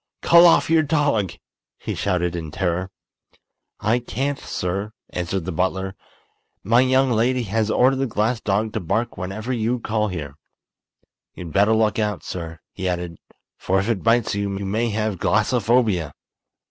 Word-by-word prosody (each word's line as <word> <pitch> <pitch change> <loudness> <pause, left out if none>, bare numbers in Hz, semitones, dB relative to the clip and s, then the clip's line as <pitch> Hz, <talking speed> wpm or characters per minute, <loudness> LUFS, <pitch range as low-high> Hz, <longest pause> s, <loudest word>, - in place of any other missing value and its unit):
"Call 170 +1 +8
off 165 - +4
your 165 0 +4
dog," 145 - +1 0.4
he - - -5
shouted, 90 -3 -1
in 80 -3 -5
terror. 90 +3 -2 0.9
"I 110 +4 +1
can't, 135 +5 -3
sir," 100 +4 -3 0.2
answered 90 0 -3
the 90 - -3
butler. 95 +2 -1 0.7
"My 115 +4 +4
young 130 0 +3
lady 120 +2 +1
has 110 +1 -1
ordered 130 +4 +3
the 135 0 0
glass 110 +1 0
dog 105 +2 0
to 110 - -1
bark 100 +6 -1
whenever 105 +7 -4
you 120 +1 0
call 110 -1 -1
here. 75 -7 -5 1.0
You'd 85 -3 -8
better 105 +3 +4
look 110 0 +1
out, 105 -3 -1
sir," 80 -2 -6
he 95 0 -3
added, 90 -2 -4 0.4
"for 95 +1 +1
if 100 +4 -2
it 110 -5 0
bites 115 0 +2
you, 100 -1 -2
you 100 - -4
may 110 +5 0
have 105 -3 -2
glassophobia!" 110 - +1
105 Hz, 160 wpm, -22 LUFS, 95-120 Hz, 1.0 s, Call